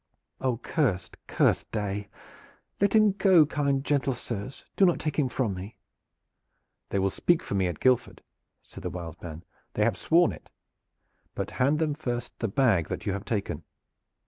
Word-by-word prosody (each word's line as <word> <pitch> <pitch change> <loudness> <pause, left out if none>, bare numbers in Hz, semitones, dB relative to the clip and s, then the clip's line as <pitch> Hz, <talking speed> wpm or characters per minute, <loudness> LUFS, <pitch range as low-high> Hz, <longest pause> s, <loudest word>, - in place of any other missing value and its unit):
"Oh, 130 -3 0
cursed, 115 - -1
cursed - - +1
day! 105 -1 -3 0.7
Let 200 +2 +2
him 215 -1 +6
go, 190 -5 +5
kind, 140 -2 0
gentle 140 -3 +1
sirs; 120 +2 -6
do - - +3
not 175 -3 +5
take 150 -1 -2
him 135 -3 +2
from 120 -5 -1
me!" 95 +4 -8 1.1
"They - - -1
will 95 0 +1
speak 175 - +2
for - - -5
me 95 -2 +2
at 85 -3 -4
Guildford," 130 -2 +1 0.4
said - - -12
the - - -3
"Wild 85 -3 -7
Man." 80 -1 -8 0.3
"They 105 - +2
have 110 -2 +2
sworn 170 - +4
it. - - -12 0.9
But - - -3
hand 140 +4 +4
them 155 -2 +1
first 120 -4 -4
the 115 - 0
bag 100 - +2
that - - -5
you 100 - 0
have 100 +1 -5
taken." 100 -8 -2
120 Hz, 170 wpm, -27 LUFS, 100-150 Hz, 1.1 s, him